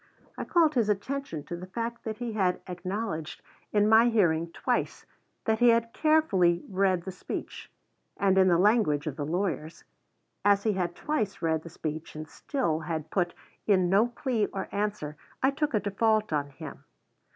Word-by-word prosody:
I -, -, -5 dB
called 330 Hz, -5 st, +3 dB
his 230 Hz, -6 st, +2 dB
attention 210 Hz, -, -2 dB
to 175 Hz, -, -6 dB
the 180 Hz, +2 st, -8 dB
fact 235 Hz, +4 st, -5 dB
that 220 Hz, -1 st, -3 dB
he 240 Hz, -2 st, -4 dB
had 185 Hz, -4 st, +1 dB
acknowledged 180 Hz, -2 st, -4 dB, 0.3 s
in 210 Hz, 0 st, +3 dB
my 225 Hz, +2 st, +6 dB
hearing 170 Hz, -7 st, +2 dB
twice -, -, -2 dB, 0.4 s
that 220 Hz, 0 st, +1 dB
he 240 Hz, 0 st, +6 dB
had 230 Hz, 0 st, +2 dB
carefully 195 Hz, -, +3 dB
read 190 Hz, -2 st, +1 dB
the 190 Hz, -, -5 dB
speech; 185 Hz, -, -7 dB, 0.5 s
and, 195 Hz, -1 st, +3 dB
in 190 Hz, -1 st, +5 dB
the 175 Hz, -2 st, +4 dB
language 195 Hz, -7 st, +3 dB
of 150 Hz, -4 st, -3 dB
the 145 Hz, -2 st, -4 dB
lawyers, 170 Hz, -2 st, -2 dB, 0.6 s
as 200 Hz, 0 st, +4 dB
he 215 Hz, -, +2 dB
had 175 Hz, -2 st, -2 dB
twice 295 Hz, -, -2 dB
read 160 Hz, -1 st, +1 dB
the 170 Hz, -, -10 dB
speech 155 Hz, 0 st, -6 dB
and 155 Hz, 0 st, -6 dB
still 210 Hz, -, -2 dB
had 160 Hz, -1 st, -4 dB
put 175 Hz, -3 st, 0 dB, 0.3 s
in 185 Hz, -4 st, +3 dB
no 205 Hz, +5 st, +5 dB
plea 240 Hz, -2 st, -1 dB
or 195 Hz, -, -5 dB
answer, 200 Hz, -8 st, -3 dB, 0.3 s
I 265 Hz, -, +5 dB
took 290 Hz, -2 st, -1 dB
a -, -, +3 dB
default 215 Hz, -1 st, +1 dB
on 145 Hz, -1 st, 0 dB
him. 135 Hz, -, -10 dB
195 Hz, 175 wpm, -28 LUFS, 170-225 Hz, 0.6 s, my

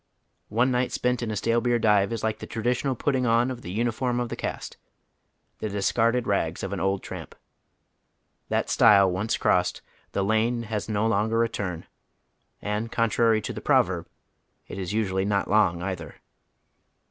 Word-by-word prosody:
One 120 Hz, +5 st, +2 dB
night 125 Hz, 0 st, 0 dB
spent 125 Hz, 0 st, 0 dB
in 120 Hz, -, -2 dB
a 110 Hz, -, -2 dB
stale 115 Hz, +3 st, +1 dB
beer 120 Hz, 0 st, +2 dB
dive 105 Hz, -3 st, +3 dB
is 115 Hz, -2 st, -3 dB
like 110 Hz, 0 st, -1 dB
the -, -, -8 dB
traditional 125 Hz, +4 st, -1 dB
putting 130 Hz, 0 st, 0 dB
on 115 Hz, +2 st, +3 dB
of 125 Hz, -2 st, -7 dB
tlie 90 Hz, -2 st, -7 dB
uniform 120 Hz, +2 st, 0 dB
of 120 Hz, -1 st, -2 dB
the -, -, -4 dB
caste, -, -, -5 dB, 0.8 s
the 110 Hz, -, -3 dB
discarded 115 Hz, +4 st, +1 dB
rags 85 Hz, -5 st, -1 dB
of 95 Hz, 0 st, -3 dB
an 100 Hz, -, -3 dB
old 95 Hz, 0 st, 0 dB
tramp. -, -, -8 dB, 1.1 s
That -, -, 0 dB
stile 100 Hz, -2 st, +5 dB
once 100 Hz, +5 st, -1 dB
crossed, -, -, +1 dB, 0.3 s
the 100 Hz, -, 0 dB
lane 110 Hz, +3 st, +1 dB
has 110 Hz, -1 st, -4 dB
no 105 Hz, 0 st, 0 dB
longer 115 Hz, +1 st, +2 dB
a 115 Hz, -, 0 dB
turn; 90 Hz, -6 st, -4 dB, 0.8 s
and 105 Hz, +2 st, -2 dB
contrary 115 Hz, -1 st, +2 dB
to -, -, -5 dB
the -, -, -7 dB
proverb, -, -, +2 dB, 0.6 s
it -, -, -7 dB
is 90 Hz, -2 st, -4 dB
usually 95 Hz, -3 st, 0 dB
not 100 Hz, 0 st, 0 dB
long 95 Hz, -5 st, +2 dB
either. 90 Hz, -5 st, -5 dB
110 Hz, 170 wpm, -26 LUFS, 100-120 Hz, 1.1 s, stile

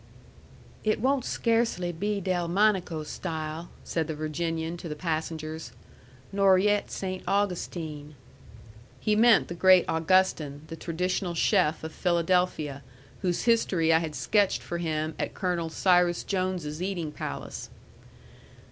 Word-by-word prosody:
"It 215 Hz, 0 st, +1 dB
won't 265 Hz, +2 st, +1 dB
scarcely 225 Hz, -7 st, +1 dB
be 205 Hz, +5 st, -2 dB
Delmonico 180 Hz, -2 st, +1 dB
style," 160 Hz, 0 st, -5 dB
said 160 Hz, -2 st, -2 dB
the 160 Hz, -, -3 dB
Virginian 160 Hz, +2 st, -2 dB
to 175 Hz, -1 st, -7 dB
the 150 Hz, -, -4 dB
passengers, 160 Hz, -1 st, -4 dB, 0.6 s
"nor 195 Hz, -1 st, +5 dB
yet 205 Hz, +2 st, +2 dB
Saynt 185 Hz, -1 st, -4 dB
Augustine." 170 Hz, -6 st, -2 dB, 0.8 s
He 210 Hz, +7 st, +1 dB
meant 225 Hz, 0 st, +5 dB
the -, -, -5 dB
great 185 Hz, +1 st, +6 dB
Augustin, 160 Hz, -3 st, +1 dB
the 165 Hz, -, -5 dB
traditional 180 Hz, +2 st, -2 dB
chef 165 Hz, -3 st, +2 dB
of 160 Hz, -, -5 dB
Philadelphia, 170 Hz, -5 st, 0 dB, 0.4 s
whose 180 Hz, -3 st, 0 dB
history 185 Hz, -8 st, +3 dB
I 160 Hz, -, +5 dB
had 160 Hz, -2 st, -4 dB
sketched 205 Hz, -3 st, +1 dB
for 170 Hz, -, -4 dB
him 155 Hz, -1 st, -1 dB
at -, -, -3 dB
Colonel 175 Hz, -3 st, -1 dB
Cyrus 175 Hz, 0 st, +3 dB
Jones's 185 Hz, -5 st, -2 dB
eating 180 Hz, -5 st, -2 dB
palace. 150 Hz, -, -6 dB
175 Hz, 125 wpm, -27 LUFS, 160-190 Hz, 0.8 s, great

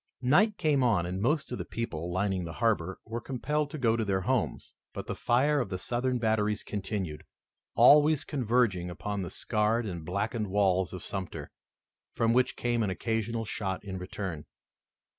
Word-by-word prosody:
Night 200 Hz, -, +4 dB
came 150 Hz, -5 st, +2 dB
on, 110 Hz, -9 st, +3 dB
and 90 Hz, +2 st, -3 dB
most 150 Hz, +6 st, +1 dB
of 125 Hz, -, -4 dB
the -, -, -2 dB
people, 90 Hz, -7 st, -4 dB
lining 95 Hz, 0 st, 0 dB
the 80 Hz, -2 st, -6 dB
harbor, 95 Hz, -6 st, 0 dB
were 115 Hz, +1 st, -4 dB
compelled 145 Hz, +3 st, -1 dB
to 155 Hz, -, -6 dB
go 115 Hz, -5 st, +2 dB
to 115 Hz, -, 0 dB
their 95 Hz, -2 st, 0 dB
homes, 125 Hz, +4 st, -1 dB, 0.2 s
but -, -, -5 dB
the -, -, -3 dB
fire 140 Hz, +5 st, +2 dB
of 120 Hz, -7 st, -2 dB
the 95 Hz, -, -3 dB
Southern 125 Hz, +5 st, -1 dB
batteries 110 Hz, -2 st, +1 dB
continued, 95 Hz, -6 st, -4 dB, 0.5 s
always 150 Hz, 0 st, +6 dB
converging 120 Hz, -, +1 dB
upon 100 Hz, +3 st, -4 dB
the 90 Hz, -, -4 dB
scarred 110 Hz, +1 st, 0 dB
and 85 Hz, -5 st, -5 dB
blackened 105 Hz, +6 st, -2 dB
walls 95 Hz, -2 st, +2 dB
of 90 Hz, -, -7 dB
Sumter, 95 Hz, -3 st, -5 dB, 0.6 s
from 115 Hz, 0 st, +2 dB
which 125 Hz, +1 st, +2 dB
came 120 Hz, -1 st, 0 dB
an 105 Hz, -, +1 dB
occasional 115 Hz, +4 st, -2 dB
shot 95 Hz, -3 st, -3 dB
in 95 Hz, -2 st, -5 dB
return. 90 Hz, -4 st, -5 dB
110 Hz, 175 wpm, -29 LUFS, 95-125 Hz, 0.6 s, always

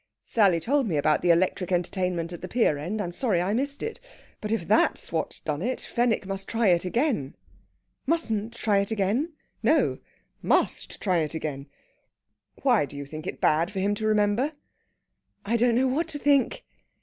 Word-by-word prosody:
"Sally 195 Hz, -7 st, +3 dB
told 270 Hz, -, +1 dB
me 165 Hz, -6 st, 0 dB
about 150 Hz, +1 st, +2 dB
the 175 Hz, -, +1 dB
electric 180 Hz, +2 st, +2 dB
entertainment 180 Hz, -1 st, -1 dB
at 175 Hz, -, -8 dB
the 185 Hz, -, -5 dB
pier 185 Hz, -9 st, +1 dB
end. 185 Hz, +9 st, -3 dB
I'm 175 Hz, -4 st, -3 dB
sorry 210 Hz, -4 st, +1 dB
I 185 Hz, +4 st, 0 dB
missed 280 Hz, +4 st, -2 dB
it. 455 Hz, -, -4 dB, 0.4 s
But 210 Hz, -, -4 dB
if 205 Hz, -7 st, -1 dB
that's 215 Hz, -, +2 dB
what's 160 Hz, -1 st, -2 dB
done 150 Hz, 0 st, -3 dB
it, 250 Hz, +6 st, -1 dB
Fenwick 235 Hz, -4 st, 0 dB
must 195 Hz, 0 st, -4 dB
try 225 Hz, -3 st, +2 dB
it 175 Hz, 0 st, +3 dB
again." 225 Hz, -, 0 dB, 0.7 s
"Mustn't 230 Hz, -8 st, 0 dB
try 210 Hz, -4 st, +2 dB
it 200 Hz, -, -1 dB
again?" 220 Hz, -, 0 dB, 0.3 s
"No -, -, +2 dB, 0.4 s
must -, -, 0 dB
try 185 Hz, -4 st, +1 dB
it 155 Hz, 0 st, -2 dB
again. 145 Hz, -3 st, -4 dB, 1.0 s
Why, 245 Hz, -, +4 dB
do 145 Hz, -, -10 dB
you 140 Hz, -, -5 dB
think 155 Hz, +2 st, -8 dB
it -, -, -5 dB
bad 165 Hz, +3 st, +2 dB
for 200 Hz, -2 st, -4 dB
him 200 Hz, +2 st, +1 dB
to 215 Hz, +1 st, -2 dB
remember?" 215 Hz, +7 st, +2 dB, 0.9 s
"I 225 Hz, +3 st, 0 dB
don't 235 Hz, 0 st, +3 dB
know 260 Hz, +2 st, +3 dB
what 295 Hz, +7 st, 0 dB
to 315 Hz, -2 st, -3 dB
think." 285 Hz, -2 st, +2 dB
205 Hz, 185 wpm, -26 LUFS, 170-235 Hz, 1.0 s, Why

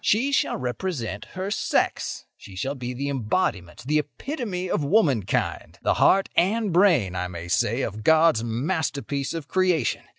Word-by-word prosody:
"She 245 Hz, +7 st, +2 dB
shall 280 Hz, -, +1 dB
represent 125 Hz, -, -4 dB
her 190 Hz, +2 st, -3 dB
sex; -, -, -1 dB
she 95 Hz, -, -13 dB
shall 130 Hz, +9 st, -2 dB
be 125 Hz, -3 st, -5 dB
the 140 Hz, +3 st, -3 dB
embodiment, 115 Hz, -, -2 dB
the 150 Hz, +2 st, +2 dB
epitome 185 Hz, -, -4 dB
of 155 Hz, -, -1 dB
womankind—the 140 Hz, -, +1 dB
heart 195 Hz, 0 st, +4 dB
and 205 Hz, +2 st, +2 dB
brain, 165 Hz, -, +4 dB
I 90 Hz, 0 st, -2 dB
may 85 Hz, -1 st, -7 dB
say, 105 Hz, +9 st, +1 dB
of 110 Hz, +1 st, -5 dB
God's 160 Hz, -4 st, +4 dB
masterpiece 140 Hz, +3 st, -2 dB
of 160 Hz, -4 st, -5 dB
creation. 180 Hz, -8 st, +1 dB
145 Hz, 145 wpm, -24 LUFS, 115-185 Hz, -, heart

